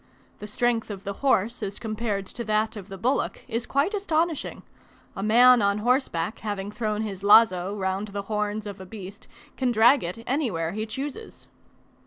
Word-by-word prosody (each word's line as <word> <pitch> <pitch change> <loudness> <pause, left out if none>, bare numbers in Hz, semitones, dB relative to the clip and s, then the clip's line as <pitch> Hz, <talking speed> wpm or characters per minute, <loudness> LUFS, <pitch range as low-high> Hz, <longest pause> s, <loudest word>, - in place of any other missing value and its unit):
The 210 - -7
strength 235 +1 0
of 195 -2 -7
the 200 -1 -4
horse 240 -4 +1
as 200 -1 -4
compared 215 -3 -3
to 235 - -6
that 215 +1 0
of 200 -3 -8
the 195 - -7
bullock 250 +8 -1
is 235 0 -3
quite 285 +9 +1
astonishing: 335 -6 -1 0.5
a - - -4
man 240 +3 +6
on 200 0 +2
horseback 225 - 0
having 205 -1 -4
thrown 215 -1 -2
his 195 -3 -5
lazo 200 -2 +5
round 190 +1 -2
the 200 0 -5
horns 210 0 -2
of 200 -2 -7
a - - -8
beast, 195 -1 -10 0.3
can 255 -2 +1
drag 240 +5 +5
it 180 +7 -5
anywhere 220 - -1
he 215 +3 -4
chooses. 275 - -7
215 Hz, 175 wpm, -25 LUFS, 200-245 Hz, 0.5 s, man